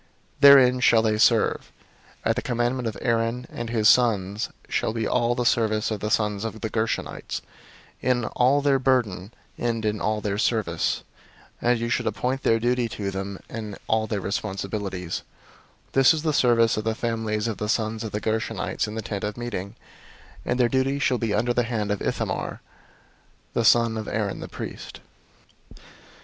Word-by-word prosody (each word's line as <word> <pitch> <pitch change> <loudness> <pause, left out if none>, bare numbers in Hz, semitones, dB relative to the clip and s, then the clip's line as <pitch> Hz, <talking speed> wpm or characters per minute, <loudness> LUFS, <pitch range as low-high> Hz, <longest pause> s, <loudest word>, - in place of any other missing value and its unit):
Therein 130 -3 +8
shall 115 -3 +4
they 110 -1 +1
serve. - - +3 0.5
004:027 - - +2
At - - -1
the 125 - -1
commandment 120 0 -1
of 110 - -4
Aaron 115 +1 0
and 120 -1 -5
his 110 -2 +2
sons 105 -4 +3 0.2
shall 110 - -1
be 115 -1 -2
all 120 0 +1
the 125 -1 -1
service 110 -2 +1
of 110 - -2
the 105 - -3
sons 105 -1 0
of 110 -1 -5
the 110 - -3
Gershonites, 110 0 -2 0.6
in 120 -2 +1
all 130 +5 +2
their 140 -1 +3
burden, 120 -7 0 0.3
and 115 -2 -1
in 105 0 -1
all 110 0 0
their 105 -1 -2
service; 105 -8 0 0.6
and 120 0 +3
you 115 - -2
shall - - 0
appoint 130 +2 -1
to - - +2 0.6
them 95 0 -5
in 110 -2 -6
charge - - -10
all 110 0 +1
their 105 -2 -2
burden. 100 - -4
004:028 95 -3 -3 0.7
This 135 +3 +5
is 155 - -4
the 155 -2 +1
service 115 -5 +3
of 110 - -2
the 110 0 -1
families 110 -2 -2
of 110 - -3
the 105 - -3
sons 110 -1 -1
of 110 - -5
the 105 - -2
Gershonites 110 0 -2
in 105 - -6
the 110 - -4
Tent 100 -1 -4
of 105 +1 -3
Meeting: 115 -4 -5 0.7
and 120 - -1
their 120 - +5
charge 135 +3 0
shall 125 - +2
be 110 -3 0
under 120 +3 +1
the 120 - +2
hand 110 -3 -2
of 105 - -2
Ithamar - - -2 0.9
the 115 - +1
son 115 0 +4
of 110 - -6
Aaron 105 -3 -2
the - - -6
priest. - - -8
115 Hz, 180 wpm, -25 LUFS, 105-120 Hz, 0.9 s, Therein